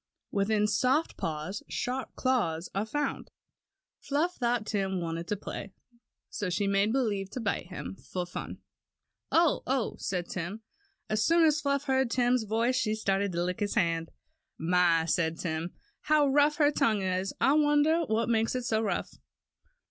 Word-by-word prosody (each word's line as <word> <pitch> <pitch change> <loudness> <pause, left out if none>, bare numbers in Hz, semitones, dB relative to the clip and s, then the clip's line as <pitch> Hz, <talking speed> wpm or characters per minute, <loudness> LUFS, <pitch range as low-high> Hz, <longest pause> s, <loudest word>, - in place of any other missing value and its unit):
"Within 210 +1 +2
soft 255 +9 +1
paws 160 +5 -4
sharp 255 +1 -3
claws 180 -11 0
are 200 +3 -1
found." 290 +4 -2 0.7
Fluff 310 +6 0
thought 240 -3 0
Tim 195 -3 -1
wanted 165 0 -4
to 210 - 0
play, 200 -1 -7 0.5
so 205 -4 -3
she 200 +3 0
made 200 +2 +2
believe 210 -7 0
to 250 - -6
bite 205 -6 -2
him, 180 - -6
just - - -22
for 180 -1 -2
fun. 175 - -6 0.7
"Oh! 335 -2 +3
oh!" 260 -3 0
said 180 -2 -2
Tim. 190 +5 -5 0.4
As 215 0 +1
soon 335 +4 +4
as 300 -1 +3
Fluff 280 -1 0
heard 265 -3 +1
Tim's 245 -1 +2
voice 230 +4 +1
she 215 -3 +1
started 200 -2 0
to 170 +1 0
lick 180 0 -2
his 205 -1 -1
hand.. 165 -1 +1 0.5
"My!" 170 -1 +3
said 165 0 0
Tim, 165 0 -3 0.2
"how 305 -1 +3
rough 290 +2 +4
her 295 -1 +4
tongue 215 -8 +1
is, 185 +1 -1
I 270 - +4
wonder 300 +2 +4
what 220 +1 +1
makes 225 0 +1
it 255 - -2
so 220 -2 +1
rough." 210 -3 -3
215 Hz, 165 wpm, -29 LUFS, 185-260 Hz, 0.7 s, soon